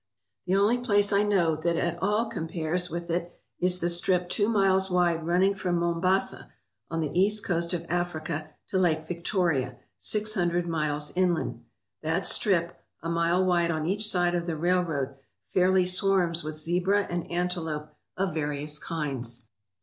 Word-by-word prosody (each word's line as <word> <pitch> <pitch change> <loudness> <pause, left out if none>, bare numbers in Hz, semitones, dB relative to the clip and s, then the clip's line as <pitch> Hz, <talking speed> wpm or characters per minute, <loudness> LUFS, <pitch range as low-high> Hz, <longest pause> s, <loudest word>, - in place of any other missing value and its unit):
The 185 - +2
only 210 +5 +3
place 205 -4 +3
I 200 - +5
know 190 -6 +2
that 170 +2 -1
at 170 0 -2
all 210 +4 +2
compares 170 -2 -2
with 170 0 -5
it 170 +1 -3 0.2
is 180 0 +2
the 175 - 0
strip 175 +1 +1
two 205 +2 +2
miles 190 -3 +3
wide 175 -3 +1
running 185 +3 +3
from 180 -3 -1
Mombasa, 170 +3 0 0.4
on 165 0 -2
the 150 -3 -2
east 205 +4 +2
coast 170 -1 0
of 170 -2 -2
Africa, 160 -3 -3 0.2
to 190 - +1
Lake 160 -3 +1
Victoria, 170 - -1 0.2
six 215 0 0
hundred 175 -3 0
miles 150 -2 -1
inland. 175 -9 0 0.4
That 165 +4 -1
strip, 170 -4 +1 0.2
a 165 - -2
mile 170 +2 +2
wide 175 -2 +2
on 155 -2 -1
each 205 +5 +2
side 175 -3 +2
of 175 -1 -2
the 165 -2 -2
railroad, 160 -6 0 0.4
fairly 185 0 +4
swarms 180 -2 +2
with 155 0 -5
zebra 180 +6 +1
and 175 -1 -4
antelope 170 -4 -2 0.3
of 190 -3 -1
various 150 -1 -2
kinds. 125 -7 -4
175 Hz, 160 wpm, -27 LUFS, 160-185 Hz, 0.4 s, I